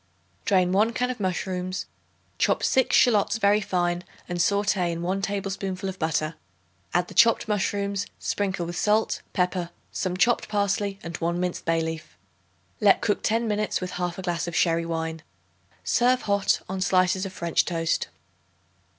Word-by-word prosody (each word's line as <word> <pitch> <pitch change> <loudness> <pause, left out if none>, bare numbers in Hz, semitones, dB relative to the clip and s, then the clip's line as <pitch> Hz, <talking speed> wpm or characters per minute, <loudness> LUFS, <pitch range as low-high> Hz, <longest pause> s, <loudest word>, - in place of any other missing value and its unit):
Drain 185 -3 +3
1 215 +5 +3
can 250 +1 0
of 250 - -7
mushrooms; 185 -1 -2 0.5
chop - - +2
6 260 - +3
shallots 220 -3 +4
very 205 0 +3
fine 175 -3 0 0.2
and 175 -1 -3
sauté 200 -1 +2
in 170 0 -3
1 190 +3 -1
tablespoonful 195 -1 -3
of 190 -1 -5
butter. 155 0 0 0.6
Add 175 0 +1
the - - -10
chopped 230 -1 +4
mushrooms; 200 -1 -1
sprinkle 190 -4 -2
with 175 +1 -5
salt, 215 +4 +1
pepper, 180 -2 0 0.2
some 180 -1 -2
chopped 240 +5 +2
parsley 200 -1 0
and 165 0 -5
1 170 +1 -1
minced 180 -1 -2
bay 165 0 +2
leaf. 160 0 -5 0.6
Let 205 -2 +5
cook 205 - +1
ten 230 +1 +1
minutes 210 0 0
with 185 -1 -5
1/2 180 +1 -3
glass 175 -2 -2
of 170 - -4
sherry 165 0 +2
wine. 160 -1 -3 0.6
Serve 250 +1 +2
hot 200 -1 +1
on 190 0 -4
slices 185 +1 +2
of - - -9
French 170 -3 +1
toast. 165 -2 -1
185 Hz, 160 wpm, -25 LUFS, 175-205 Hz, 0.6 s, Let